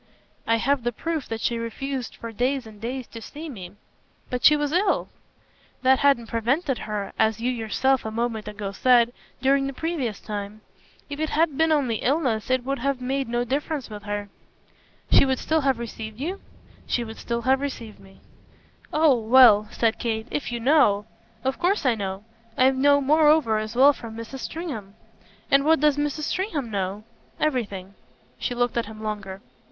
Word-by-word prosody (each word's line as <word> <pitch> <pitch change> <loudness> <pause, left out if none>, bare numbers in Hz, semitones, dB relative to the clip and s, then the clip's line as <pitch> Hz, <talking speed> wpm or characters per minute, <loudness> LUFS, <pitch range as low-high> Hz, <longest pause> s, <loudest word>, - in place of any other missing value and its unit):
"I 230 - +4
have 270 +4 +1
the 240 - 0
proof 320 +4 -3
that 225 0 -4
she 235 -1 0
refused 255 +2 -4
for 230 - -7
days 250 +3 -1
and 215 -2 -13
days 250 +2 -4
to 230 - -9
see 305 +8 -8
me." 190 -8 -9 0.6
"But 250 -1 -2
she 300 - +7
was 295 -1 -1
ill." 370 +5 +1 0.7
"That 260 0 +5
hadn't 275 -5 +3
prevented 250 +5 0
her 210 -2 -4
as 220 0 +2
you 245 +2 0
yourself 250 +3 0
a 220 - -3
moment 225 -1 -2
ago 205 -1 -5
said 240 +2 +4 0.3
during 275 +1 +3
the 275 - -4
previous 270 -9 -3
time. 210 0 -6 0.5
If 285 0 -6
it 315 0 -1
had 310 -1 +1
been 320 +2 +2
only 265 -7 +2
illness 255 -5 0
it 255 -1 +2
would 275 0 -2
have 275 +1 -1
made 265 +1 -2
no 240 +1 0
difference 275 +1 -3
with 210 -1 -7
her." 205 0 -4 0.8
"She - - +7
would 265 -1 +1
still 315 +4 0
have 270 -3 +2
received 220 -1 -7
you?" 355 +8 -4 0.5
"She 240 - 0
would 220 -1 -8
still 235 0 -3
have 265 +1 +3
received 235 -6 -6
me." 195 0 -18 0.7
"Oh 305 -2 +5
well," 225 -2 +6
said 230 -1 0
Kate, 220 -2 -2
"if 290 - -3
you 240 - -3
know 230 -6 +3 0.2
!" 220 - -33
"Of 265 0 -1
course 365 -2 +1
I 255 - +4
know. 195 -2 -4 0.3
I 260 +1 +5
know 285 +2 +4
moreover 300 -5 +4
as 215 +2 -5
well 275 +3 +7
from 230 -4 -9
Mrs. 230 +4 -7
Stringham." 240 - -6 0.6
"And 275 0 +5
what 320 +1 +4
does 300 -1 +3
Mrs. 295 +1 -1
Stringham 310 - -2
know?" 195 +1 -3 0.4
"Everything." 205 -10 -2 0.5
She 245 - -2
looked 245 0 0
at 235 - 0
him 220 0 -10
longer. 200 -3 -5
245 Hz, 185 wpm, -24 LUFS, 220-280 Hz, 0.8 s, she